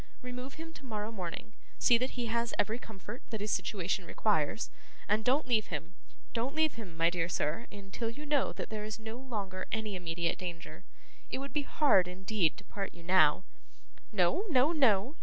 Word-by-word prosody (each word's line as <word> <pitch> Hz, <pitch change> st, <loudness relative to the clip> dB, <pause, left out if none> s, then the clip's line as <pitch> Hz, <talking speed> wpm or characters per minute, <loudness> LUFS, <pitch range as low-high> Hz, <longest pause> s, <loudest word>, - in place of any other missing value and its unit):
Remove 250 Hz, +2 st, -6 dB
him 325 Hz, +1 st, -8 dB
tomorrow 220 Hz, -7 st, -4 dB
morning, 190 Hz, +1 st, -5 dB, 0.2 s
see 240 Hz, -, +6 dB
that 255 Hz, +3 st, 0 dB
he 245 Hz, -, 0 dB
has 235 Hz, +1 st, 0 dB
every 220 Hz, +4 st, +1 dB
comfort 220 Hz, +2 st, -8 dB
that 220 Hz, -, -3 dB
his 210 Hz, +1 st, -1 dB
situation 190 Hz, -2 st, 0 dB
requires, 200 Hz, +1 st, +1 dB, 0.4 s
and 215 Hz, +1 st, +2 dB
don't 270 Hz, +6 st, +3 dB
leave 220 Hz, -4 st, +3 dB
him; 165 Hz, +2 st, -4 dB, 0.4 s
don't 245 Hz, +5 st, -1 dB
leave 315 Hz, -2 st, +3 dB
him, 195 Hz, -8 st, -8 dB
my 165 Hz, 0 st, +5 dB
dear 170 Hz, -1 st, 0 dB
sir, 170 Hz, +8 st, -1 dB
until 205 Hz, +3 st, -4 dB
you 290 Hz, +6 st, -7 dB
know 290 Hz, -2 st, +2 dB
that -, -, -6 dB
there 215 Hz, -1 st, -3 dB
is 215 Hz, 0 st, -4 dB
no 220 Hz, 0 st, -6 dB
longer 205 Hz, -8 st, -4 dB
any 220 Hz, -2 st, -1 dB
immediate 170 Hz, -1 st, -1 dB
danger. 175 Hz, -1 st, -6 dB, 0.5 s
It -, -, -2 dB
would 275 Hz, +1 st, -5 dB
be 295 Hz, -, +2 dB
hard, 275 Hz, -, +4 dB
indeed, 185 Hz, -2 st, +1 dB
to 200 Hz, -, -10 dB
part 195 Hz, -2 st, -5 dB
you 170 Hz, -, -12 dB
now. 170 Hz, -1 st, +5 dB, 0.7 s
No, 215 Hz, -, +3 dB
no, 280 Hz, 0 st, +5 dB
no! 260 Hz, -, +3 dB
215 Hz, 185 wpm, -32 LUFS, 185-250 Hz, 0.7 s, see